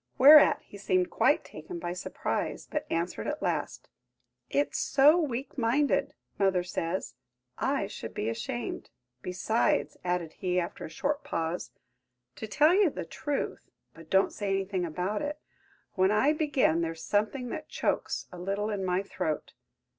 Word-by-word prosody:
Whereat 290 Hz, +3 st, +8 dB
he 200 Hz, -, -13 dB
seemed 185 Hz, -2 st, +1 dB
quite -, -, +3 dB
taken 155 Hz, +3 st, -8 dB
by 175 Hz, +1 st, -4 dB
surprise, 180 Hz, -, -3 dB
but 300 Hz, -, -4 dB
answered 170 Hz, +2 st, -2 dB
at 300 Hz, +1 st, -3 dB
last: -, -, -2 dB, 0.6 s
"It's 285 Hz, -, 0 dB
so 285 Hz, +3 st, +5 dB
weak 270 Hz, -3 st, -3 dB
minded, 250 Hz, +5 st, +1 dB, 0.2 s
mother 190 Hz, -2 st, +3 dB
says; 175 Hz, 0 st, -3 dB, 0.5 s
I -, -, +1 dB
should -, -, -8 dB
be 105 Hz, -, -2 dB
ashamed. 115 Hz, +1 st, -4 dB, 0.3 s
Besides," 220 Hz, -, 0 dB
added 175 Hz, -3 st, -1 dB
he, 180 Hz, -1 st, 0 dB
after 170 Hz, -, -4 dB
a -, -, -7 dB
short 285 Hz, -, -2 dB
pause, 165 Hz, +2 st, -3 dB, 0.7 s
"to 220 Hz, -, -5 dB
tell 300 Hz, +10 st, +4 dB
you 390 Hz, -2 st, +5 dB
the -, -, -6 dB
truth–but 165 Hz, -, -6 dB
don't 190 Hz, 0 st, +3 dB
say 205 Hz, -1 st, -3 dB
anything 195 Hz, -1 st, 0 dB
about 180 Hz, -, -2 dB
it–when 290 Hz, -9 st, -3 dB
I 215 Hz, +9 st, +3 dB
begin 285 Hz, -, +2 dB
there's 165 Hz, -1 st, -3 dB
something 225 Hz, +5 st, 0 dB
that 310 Hz, +5 st, -6 dB
chokes -, -, -1 dB
a 180 Hz, -, -9 dB
little 200 Hz, +4 st, -2 dB
in 200 Hz, -2 st, -2 dB
my 185 Hz, +1 st, 0 dB
throat. 170 Hz, -6 st, -3 dB
195 Hz, 145 wpm, -29 LUFS, 180-280 Hz, 0.7 s, Whereat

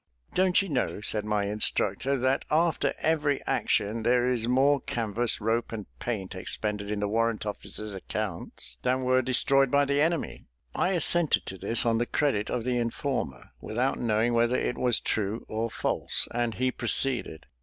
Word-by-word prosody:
"Don't 185 Hz, +1 st, +3 dB
you -, -, -6 dB
know," 135 Hz, -, -1 dB
said 105 Hz, 0 st, -3 dB
my 105 Hz, -1 st, 0 dB
instructor, 105 Hz, +5 st, 0 dB
"that 130 Hz, +2 st, +1 dB
after 165 Hz, +2 st, +2 dB
every 150 Hz, -3 st, +1 dB
action 105 Hz, +2 st, 0 dB
there 120 Hz, +2 st, +2 dB
is 120 Hz, -3 st, 0 dB
more 135 Hz, +3 st, +3 dB
canvas, 115 Hz, 0 st, 0 dB
rope, 115 Hz, +2 st, -1 dB
and 110 Hz, -3 st, -5 dB
paint, 100 Hz, -6 st, -4 dB
expended 105 Hz, +2 st, -3 dB
in 105 Hz, -1 st, -2 dB
the 105 Hz, -, 0 dB
warrant 115 Hz, +1 st, 0 dB
officer's 105 Hz, 0 st, -6 dB
accounts 95 Hz, -, -5 dB
than 130 Hz, +1 st, 0 dB
were 130 Hz, 0 st, +3 dB
destroyed 135 Hz, +2 st, +2 dB
by 140 Hz, +2 st, +3 dB
the 140 Hz, +1 st, +1 dB
enemy?" 165 Hz, 0 st, -1 dB, 0.3 s
I 190 Hz, -, +1 dB
assented 175 Hz, -1 st, +2 dB
to 95 Hz, -, -6 dB
this 115 Hz, +5 st, 0 dB
on 115 Hz, -1 st, +2 dB
the 120 Hz, -, 0 dB
credit 130 Hz, -8 st, 0 dB
of 120 Hz, -, -2 dB
the 125 Hz, 0 st, 0 dB
informer, 115 Hz, -, -3 dB
without 125 Hz, +5 st, -1 dB
knowing 115 Hz, +1 st, +1 dB
whether 120 Hz, +1 st, +2 dB
it -, -, -1 dB
was 125 Hz, -3 st, +3 dB
true 105 Hz, +1 st, -1 dB
or 115 Hz, +1 st, -2 dB
false, -, -, +1 dB
and 120 Hz, -1 st, -1 dB
he 130 Hz, 0 st, 0 dB
proceeded. 120 Hz, -8 st, +1 dB
120 Hz, 170 wpm, -27 LUFS, 105-135 Hz, 0.3 s, Don't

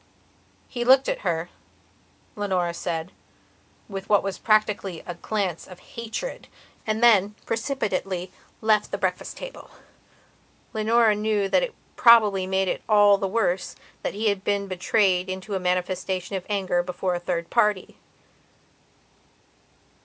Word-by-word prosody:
He 240 Hz, -2 st, -3 dB
looked 265 Hz, +2 st, +5 dB
at -, -, -1 dB
her, 170 Hz, -2 st, -2 dB, 0.8 s
Leonora 185 Hz, -4 st, -1 dB
said, 170 Hz, 0 st, -4 dB, 0.8 s
with 195 Hz, -2 st, -7 dB
what 205 Hz, -, +4 dB
was 195 Hz, -1 st, -4 dB
practically 210 Hz, -5 st, +1 dB
a 175 Hz, -, -5 dB
glance 185 Hz, -1 st, -3 dB
of 180 Hz, -1 st, -12 dB
hatred 235 Hz, -, -5 dB, 0.4 s
and 215 Hz, +2 st, 0 dB
then, 210 Hz, -3 st, +5 dB
precipitately, 200 Hz, -7 st, -2 dB
he 185 Hz, -, -21 dB, 0.3 s
left 215 Hz, -1 st, +3 dB
the -, -, -3 dB
breakfast -, -, -3 dB
table. -, -, -9 dB, 1.0 s
Leonora 220 Hz, 0 st, +3 dB
knew 210 Hz, -1 st, 0 dB
that -, -, +3 dB
it -, -, -3 dB, 0.2 s
probably 210 Hz, -6 st, +6 dB
made 190 Hz, 0 st, +1 dB
it -, -, -2 dB
all 205 Hz, -2 st, +6 dB
the 195 Hz, -, -1 dB
worse 190 Hz, -3 st, -1 dB, 0.3 s
that -, -, -3 dB
he 215 Hz, +1 st, +1 dB
had 200 Hz, -2 st, -2 dB
been 200 Hz, 0 st, 0 dB
betrayed 185 Hz, 0 st, +1 dB
into 190 Hz, +2 st, -5 dB
a 190 Hz, -, 0 dB
manifestation 185 Hz, +1 st, -2 dB
of 185 Hz, -, -5 dB
anger 190 Hz, -3 st, +1 dB
before 180 Hz, +1 st, -2 dB
a 175 Hz, -, -2 dB
third 175 Hz, -1 st, -3 dB
party. 210 Hz, -5 st, +1 dB
195 Hz, 140 wpm, -25 LUFS, 185-215 Hz, 1.0 s, probably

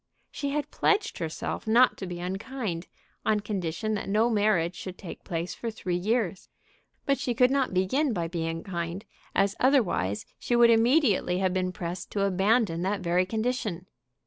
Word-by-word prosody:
She 285 Hz, -, -3 dB
had 290 Hz, +1 st, -2 dB
pledged 420 Hz, +1 st, +1 dB
herself 165 Hz, +5 st, -4 dB
not 240 Hz, +3 st, +5 dB
to 190 Hz, -, -5 dB
be 175 Hz, -1 st, -5 dB
unkind, 190 Hz, 0 st, -4 dB, 0.4 s
on 215 Hz, -1 st, +2 dB
condition 205 Hz, 0 st, -2 dB
that 205 Hz, -2 st, -3 dB
no 220 Hz, +4 st, +3 dB
marriage 205 Hz, -6 st, +2 dB
should 185 Hz, 0 st, -7 dB
take 180 Hz, -, -9 dB
place 170 Hz, +1 st, -3 dB
for 235 Hz, -, -4 dB
three 185 Hz, -5 st, -3 dB
years. 200 Hz, 0 st, -1 dB, 0.6 s
But 275 Hz, -1 st, +1 dB
she 245 Hz, -, -1 dB
could 250 Hz, +2 st, +4 dB
not 275 Hz, -2 st, +1 dB
begin 220 Hz, +11 st, +1 dB
by 170 Hz, -6 st, -1 dB
being 165 Hz, -1 st, -3 dB
kind, 175 Hz, +2 st, -4 dB, 0.3 s
as 195 Hz, 0 st, +2 dB
otherwise 200 Hz, -, +2 dB
she 240 Hz, -, 0 dB
would 235 Hz, 0 st, +7 dB
immediately 230 Hz, -, +3 dB
have 185 Hz, -1 st, +1 dB
been 185 Hz, -1 st, 0 dB
pressed 175 Hz, 0 st, -5 dB
to 200 Hz, -, +1 dB
abandon 195 Hz, -1 st, +2 dB
that 195 Hz, +2 st, -1 dB
very 180 Hz, +1 st, +1 dB
condition. 220 Hz, -5 st, -2 dB
195 Hz, 170 wpm, -27 LUFS, 180-235 Hz, 0.6 s, would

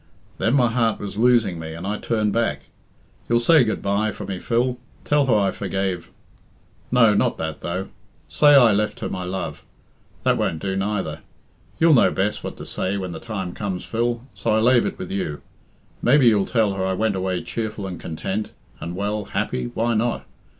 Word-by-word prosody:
Then 115 Hz, -, +2 dB
my 125 Hz, -4 st, +4 dB
heart 115 Hz, -2 st, +1 dB
was 100 Hz, -1 st, -6 dB
losing 110 Hz, -6 st, +3 dB
me, 80 Hz, 0 st, -6 dB
and 85 Hz, +3 st, -7 dB
I 105 Hz, +2 st, -2 dB
turned 105 Hz, -3 st, 0 dB
back. 115 Hz, 0 st, -1 dB, 0.6 s
You'll 120 Hz, -, +4 dB
say 155 Hz, +3 st, +5 dB
good 110 Hz, -, -2 dB
bye 100 Hz, +2 st, +1 dB
for 105 Hz, 0 st, -7 dB
me, 95 Hz, -2 st, -4 dB
Phil 125 Hz, +4 st, 0 dB, 0.3 s
Tell 145 Hz, -2 st, +2 dB
her 120 Hz, -, +4 dB
I 100 Hz, -2 st, +2 dB
forgave 95 Hz, -3 st, -3 dB, 0.8 s
no, 115 Hz, -4 st, +5 dB
not -, -, +1 dB
that, 80 Hz, -1 st, -4 dB
though. 90 Hz, +3 st, -3 dB, 0.4 s
Say 145 Hz, -, +5 dB
I 120 Hz, -5 st, +7 dB
left 105 Hz, +1 st, 0 dB
her -, -, -2 dB
my 90 Hz, -, -4 dB
love 95 Hz, +1 st, -4 dB, 0.6 s
that -, -, +2 dB
won't 80 Hz, -, 0 dB
do 95 Hz, +2 st, -2 dB
neither. 95 Hz, -5 st, -2 dB, 0.6 s
You'll 165 Hz, -1 st, +6 dB
know 125 Hz, -, +6 dB
best 100 Hz, +2 st, -1 dB
what -, -, -6 dB
to -, -, -8 dB
say 95 Hz, +2 st, -2 dB
when 95 Hz, -2 st, -4 dB
the 80 Hz, -, -6 dB
time 95 Hz, -6 st, -5 dB
comes, 95 Hz, -3 st, -4 dB
Phil, 120 Hz, +1 st, -1 dB
so -, -, -3 dB
I -, -, +3 dB
lave 120 Hz, +1 st, +4 dB
it -, -, -5 dB
with 90 Hz, -, -6 dB
you. 80 Hz, -7 st, -3 dB, 0.6 s
Maybe 135 Hz, +2 st, +5 dB
you'll 105 Hz, -3 st, +2 dB
tell 110 Hz, -4 st, +2 dB
her 95 Hz, -1 st, -2 dB
I 95 Hz, 0 st, 0 dB
went 110 Hz, +1 st, 0 dB
away 95 Hz, -1 st, -2 dB
cheerful 110 Hz, -3 st, -4 dB
and 90 Hz, -2 st, -6 dB
content, 95 Hz, +6 st, -4 dB, 0.3 s
and, 85 Hz, +1 st, -5 dB
well, 105 Hz, +2 st, -2 dB
happy 65 Hz, -8 st, -2 dB
why 115 Hz, +1 st, +1 dB
not? 115 Hz, +2 st, 0 dB
105 Hz, 195 wpm, -22 LUFS, 95-115 Hz, 0.8 s, I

